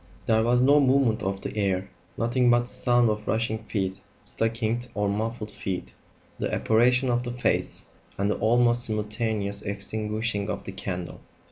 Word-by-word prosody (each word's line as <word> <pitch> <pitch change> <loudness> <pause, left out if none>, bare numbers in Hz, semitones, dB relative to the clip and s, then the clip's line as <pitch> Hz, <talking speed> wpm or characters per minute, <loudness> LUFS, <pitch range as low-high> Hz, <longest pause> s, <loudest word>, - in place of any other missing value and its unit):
There 110 -1 +3
was 120 +2 +3
no 145 +3 +6
movement 130 -5 +3
of 95 -1 -2
the - - -5
air; 95 -2 0 0.3
nothing 120 +1 +2
but 120 0 +5
the 120 - -8
sound 120 -2 +2
of 105 0 -5
rushing 110 0 0
feet 95 -3 -2 0.3
stockinged 115 +1 -1
or 105 0 0
muffled 110 +2 -2
feet; 95 -2 -5 0.5
the - - -1
apparition 125 +3 +3
of 120 0 +1
the 120 -1 -5
face; 125 - -1 0.3
and 100 - +1
the 105 - 0
almost 120 +2 +3
simultaneous 105 -1 -1
extinguishing 105 +1 -2
of - - -3
the - - -6
candle. 90 -2 -5
110 Hz, 160 wpm, -26 LUFS, 100-120 Hz, 0.5 s, no